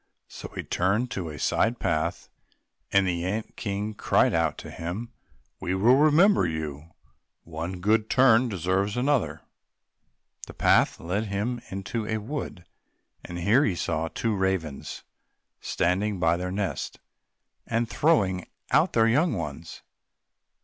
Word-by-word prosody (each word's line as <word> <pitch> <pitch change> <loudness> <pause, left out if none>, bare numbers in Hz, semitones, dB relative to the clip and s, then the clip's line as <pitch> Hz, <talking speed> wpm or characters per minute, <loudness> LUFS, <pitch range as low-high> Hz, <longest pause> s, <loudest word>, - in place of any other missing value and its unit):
So - - -9
he - - -4
turned 100 +6 +1
on - - -4
to 90 -8 -4
a 75 - -7
side 115 +9 +1
path 80 -6 -1 0.6
and 100 -1 +4
the 85 -2 -1
ant 105 +5 -3
king 105 0 -3
cried - - +2
out 80 -2 +1
to - - -9
him, 100 +9 -5 0.5
"We 90 - -2
will 115 +7 +5
remember 155 - +5
you—one 80 +2 -7
good 110 +3 +2
turn 125 -2 +5
deserves 95 +2 -1
another!" 135 +1 0 1.1
The - - -11
path - - +3
led 95 +6 -2
him 110 +5 -2
into 105 +3 -4
a 110 - -1
wood, 110 - -6 0.6
and 85 - -7
here 105 +10 +3
he 100 -9 +1
saw 80 -1 -1
two 115 +7 -2
old 100 - -1
ravens 90 -7 -2 0.6
standing 95 +4 0
by 80 -1 +3
their 90 +1 -3
nest, 100 +1 -3 0.7
and 115 0 0
throwing 100 - +1 0.2
out - - +3
their 115 -1 +4
young 145 +8 +3
ones. 80 -3 -6
100 Hz, 140 wpm, -26 LUFS, 85-115 Hz, 1.1 s, will